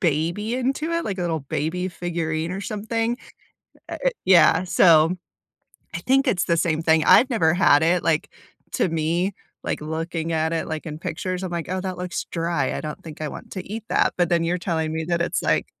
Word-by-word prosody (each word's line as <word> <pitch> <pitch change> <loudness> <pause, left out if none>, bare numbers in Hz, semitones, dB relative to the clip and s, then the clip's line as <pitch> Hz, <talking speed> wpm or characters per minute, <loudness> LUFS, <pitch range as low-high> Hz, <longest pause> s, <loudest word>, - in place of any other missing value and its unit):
baby 175 +7 0
into 270 +5 -1
it, 335 0 0
like 200 -2 -3
a - - -1
little 165 -2 -1
baby 160 +6 -2
figurine 165 -2 -3
or 190 - -4
something. 225 +2 -2 0.7
Uh, - - -4
uh, - - +6 0.2
yeah, 180 -2 +6
so, 170 -2 +5 0.8
I - - -2
think 270 +2 +2
it's 195 -6 +2
the 170 -2 +1
same 160 -1 +1
thing. 160 -1 +4
I've 255 - +6
never 175 -10 +2
had 155 -5 +5
it, 175 +2 +2
like, 155 -2 +1 0.4
to - - +2
me, 165 +4 0 0.3
like, - - -3
looking 160 +1 -3
at 160 +1 0
it, 165 - -2
like, 155 -1 -4
in 155 -1 -6
pictures, 185 +2 -3
I'm 185 - -4
like, 170 -2 -3
"Oh, 185 0 -2
that 185 -1 -4
looks 180 -1 -4
dry. 165 -5 -1
I - - -3
don't 155 -1 -6
think 155 -2 -9
I 155 - -2
want - - -10
to 185 - -6
eat 220 0 -5
that." - - +2
but 175 -2 +2
then 170 -1 +2
you're 175 +2 0
telling 160 -3 -1
me 160 0 -2
that 170 0 0
it's, - - -1
like, - - +1
170 Hz, 215 wpm, -23 LUFS, 160-190 Hz, 0.8 s, uh